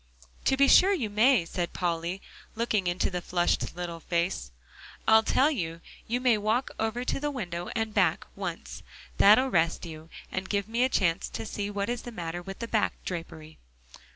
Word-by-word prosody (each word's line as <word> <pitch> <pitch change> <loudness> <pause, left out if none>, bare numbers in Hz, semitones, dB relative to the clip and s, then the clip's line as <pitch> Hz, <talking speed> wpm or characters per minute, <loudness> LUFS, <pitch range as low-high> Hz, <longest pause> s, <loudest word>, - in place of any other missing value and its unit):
"To 265 - +3
be 275 0 +5
sure 385 +8 +7
you 230 - -3
may," 220 -2 +4
said 175 0 -3
Polly, 175 +1 -2 0.3
looking 220 -4 0
into 175 +2 0
the 180 -1 -3
flushed 175 -1 0
little 175 -1 -5
face; 170 - -1 0.6
"I'll 220 0 +7
tell 270 +6 +3
you, 165 - -3 0.3
you 240 +2 0
may 245 -4 +3
walk 220 +5 0
over 225 +3 -1
to - - -1
the 295 +1 -1
window 180 -10 -4
and 225 -2 -1
back, 185 -6 +2
once; 190 -4 -6 0.4
that'll 220 +6 +6
rest 165 -2 +1
you 160 -1 -9 0.2
and 190 0 -4
give 200 -1 0
me 230 +2 +1
a 260 - +3
chance 170 -8 +1
to - - -5
see 205 -1 -4
what 200 -1 -2
is 240 0 -2
the 240 - -8
matter 175 -4 -5
with 195 +2 -8
that 230 - -6
back 220 - +2
drapery." 165 -3 -7
200 Hz, 185 wpm, -28 LUFS, 175-230 Hz, 0.6 s, sure